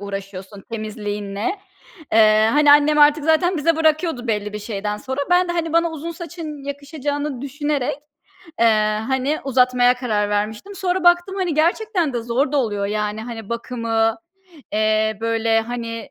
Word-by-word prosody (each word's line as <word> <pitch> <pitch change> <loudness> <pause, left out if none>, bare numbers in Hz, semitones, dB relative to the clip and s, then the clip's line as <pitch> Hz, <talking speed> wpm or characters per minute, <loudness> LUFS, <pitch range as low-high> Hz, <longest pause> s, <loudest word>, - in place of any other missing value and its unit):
uğraşıyorsun 195 0 -8
temizliğinle. 210 - -4 0.5
Eee, 215 0 +5
hani, 295 0 +6
annem 295 +1 +4
artık 295 0 +5
zaten 345 +3 +2
bize 320 +2 +1
bırakıyordu 315 -4 +1
belli 210 -2 -2
bir 210 - -4
şeyden 210 -1 -4
sonra. 265 +5 -4
Ben 360 0 +4
de, 345 - -1
hani, 330 -2 -2
bana 335 0 +2
uzun 320 +1 -6
saçın 325 -4 -8
yakışacağını 285 -1 -4
düşünerek, 285 -1 -2 0.6
eee, 215 -1 +3
hani, 265 +3 0
uzatmaya 250 -2 +3
karar 215 -5 -1
vermiştim. 215 - -3
Sonra 375 -1 -1
baktım, 350 +2 +3
hani, 360 -4 -1
gerçekten 340 - +1
de 240 - -2
zor 255 +5 0
da - - +1
oluyor. 205 -6 0
Yani, 210 +1 -2
hani, 225 -3 -8
bakımı, 230 -1 -1 0.6
eee, 215 0 +1
böyle, 225 0 +1
hani, 230 0 -6
250 Hz, 150 wpm, -21 LUFS, 215-310 Hz, 0.6 s, hani